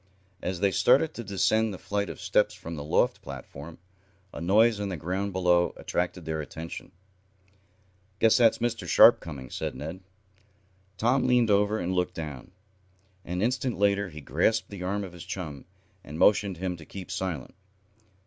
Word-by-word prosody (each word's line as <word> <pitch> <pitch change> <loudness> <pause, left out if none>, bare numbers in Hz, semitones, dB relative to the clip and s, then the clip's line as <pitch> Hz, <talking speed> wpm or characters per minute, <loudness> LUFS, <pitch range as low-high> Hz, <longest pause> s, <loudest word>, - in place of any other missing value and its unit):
As 90 -1 -3
they 100 -1 +3
started 140 +10 +4
to 120 - -6
descend 110 +3 +1
the 95 - -6
flight 100 0 -2
of - - -8
steps - - +1
from 85 - -8
the 75 - -6
loft 75 - +1
platform, 75 +4 -9 0.6
a - - -7
noise 105 +5 +4
on 100 -1 -2
the 95 - -4
ground 95 +6 -2
below 90 -2 +2
attracted 90 -1 -3
their 80 -1 -2
attention. 80 +4 -8 1.3
"Guess 110 +1 +4
that's 115 -3 +5
Mr. 120 0 -2
Sharp - - +7
coming," 65 -6 -9
said - - -4
Ned. 80 +5 -6 1.0
Tom 125 +4 +2
leaned 120 -3 +3
over 105 +1 +3
and 90 -2 -2
looked 90 0 -1
down. 75 -1 -7 0.7
An 90 +3 -3
instant 125 +1 0
later 100 0 +2
he 75 -2 -10
grasped 85 - 0
the 100 -3 -7
arm 100 +3 -2
of 95 -3 -8
his 85 - -9
chum, 85 -7 -6 0.4
and 75 - -8
motioned 100 +1 +3
to 85 - -14
him 90 -2 -2
to 80 - -12
keep 95 -3 -8
silent. 85 -9 -4
95 Hz, 170 wpm, -27 LUFS, 85-105 Hz, 1.3 s, Sharp